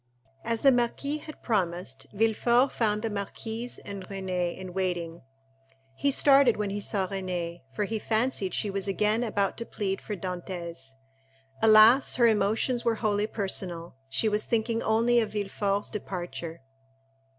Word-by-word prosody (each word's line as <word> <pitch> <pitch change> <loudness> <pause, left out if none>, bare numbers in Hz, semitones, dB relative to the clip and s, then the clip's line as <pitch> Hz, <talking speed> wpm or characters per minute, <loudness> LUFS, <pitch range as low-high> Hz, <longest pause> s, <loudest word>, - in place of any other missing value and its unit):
As 230 -1 -1
the 275 - +7
marquis 255 +4 0
had 310 0 -11
promised, 175 - -2
Villefort 235 +4 +2
found 210 -2 0
the 225 - 0
marquise 220 +4 -4
and 200 -1 -8
Renée 185 -3 -3
in 185 -1 -8
waiting. 175 -3 -2 0.7
He 280 - +1
started 275 -3 +5
when 210 -1 -2
he 205 +1 -3
saw 200 -2 0
Renée, 180 -3 -4 0.2
for - - 0
he 220 +2 -3
fancied 220 -3 0
she 205 - 0
was 195 0 -3
again 210 +4 +1
about 205 -4 -1
to 230 - -5
plead 195 -2 -3
for 210 - -5
Dantès. 175 -6 -6 0.7
Alas, 220 +4 +7
her 240 - +4
emotions 225 +3 +2
were 230 -1 +2
wholly 210 -1 0
personal: 185 -5 -3 0.2
she 220 - +1
was 210 0 +1
thinking 230 0 0
only 230 +2 +3
of 220 -2 -2
Villefort's 200 0 -1
departure. 175 -6 -6
210 Hz, 150 wpm, -27 LUFS, 185-230 Hz, 0.7 s, the